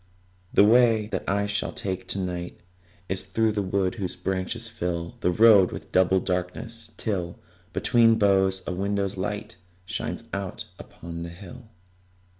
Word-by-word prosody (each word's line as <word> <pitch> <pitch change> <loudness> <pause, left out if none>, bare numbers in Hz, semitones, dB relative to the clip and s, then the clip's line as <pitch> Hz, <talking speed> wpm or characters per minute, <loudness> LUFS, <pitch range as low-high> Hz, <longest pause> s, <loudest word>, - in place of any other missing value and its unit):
The - - +6
way 115 0 +5
that - - -2
I 100 +1 +1
shall 105 0 -2
take 95 -1 -3
to - - -1
night 90 -2 -4 0.5
Is 95 0 -2
through 110 +4 +1
the 105 -1 -1
wood 95 -1 0
whose 90 - -2
branches 95 +5 -2
fill 85 -6 -3
The - - +1
road 105 -1 +6
with - - -8
double 95 0 +4
darkness, 95 +6 -4
till, 90 -6 -3 0.3
Between 115 +5 +4
the - - +3
boughs, 95 -2 +3
a - - -3
window's 100 +1 -1
light 105 +3 -4 0.3
Shines - - -4
out 100 -1 -4
upon 85 0 -9
the 85 - -5
hill. 105 +7 -12
95 Hz, 155 wpm, -26 LUFS, 90-105 Hz, 0.5 s, The